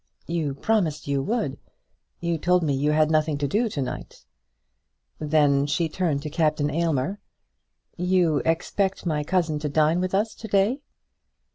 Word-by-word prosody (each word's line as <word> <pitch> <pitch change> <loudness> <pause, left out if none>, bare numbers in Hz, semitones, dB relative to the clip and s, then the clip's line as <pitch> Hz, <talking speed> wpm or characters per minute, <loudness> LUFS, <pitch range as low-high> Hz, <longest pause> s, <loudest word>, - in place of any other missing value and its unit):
"You 160 -5 -2
promised 165 -4 0
you 140 -1 0
would. 150 - -2 0.6
You 170 -1 -1
told 180 +2 +2
me 145 -3 +1
you 145 +3 +1
had 155 0 +3
nothing 155 -1 +2
to 145 0 -1
do 220 - +1
to 145 - -3
night." - - -7 0.9
Then 145 -2 +2
she 165 +3 0
turned 155 -4 -1
to 155 - -4
Captain 150 -2 +1
Aylmer. 165 +4 0 0.8
"You 180 -3 +2
expect 180 +6 -1
my 150 -3 0
cousin 165 -2 0
to 150 0 -3
dine 155 +4 +2
with 185 +1 -1
us 215 +2 0
to 220 - -9
day?" 210 +7 +2
160 Hz, 155 wpm, -25 LUFS, 150-180 Hz, 0.9 s, had